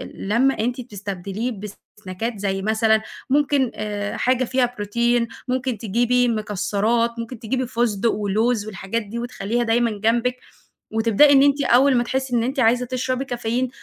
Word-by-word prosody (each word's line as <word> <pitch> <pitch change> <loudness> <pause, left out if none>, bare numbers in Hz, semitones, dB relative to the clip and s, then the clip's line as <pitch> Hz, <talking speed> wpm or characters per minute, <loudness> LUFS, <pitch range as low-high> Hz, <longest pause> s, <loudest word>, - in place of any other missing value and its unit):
لما 240 +7 +1
أنتِ 245 +3 -1
بتستبدليه 200 +2 -5 0.5
بسناكات 210 +4 -4
زي 195 -1 -1
مثلًا 220 +1 +2 0.3
ممكن 280 -2 +2
آآ 205 -1 -4
حاجة 255 0 +2
فيها 245 -1 0
بروتين 235 +3 +1 0.2
ممكن 255 -2 -1
تجيبي 240 +4 +1
مكسرات 215 +2 0
ممكن 230 0 -6
تجيبي 255 +2 -2
فسدق 230 -2 0
ولوز 215 +2 0
والحاجات 200 +3 -3
دي 220 +3 -6
وتخليها 240 -1 -2
دايمًا 235 0 +2
جنبِك 230 +4 0 0.6
وتبدأي 230 +6 +5
إن 270 0 +6
أنتِ 285 0 +3
أول 260 +3 +5
ما 240 - +3
تحسي 260 0 -1
إن 230 - +2
أنتِ 260 +2 -1
عايزة 245 +2 +3
تشربي 255 +1 -2
كافيين 245 0 -2
235 Hz, 150 wpm, -22 LUFS, 215-250 Hz, 0.6 s, إن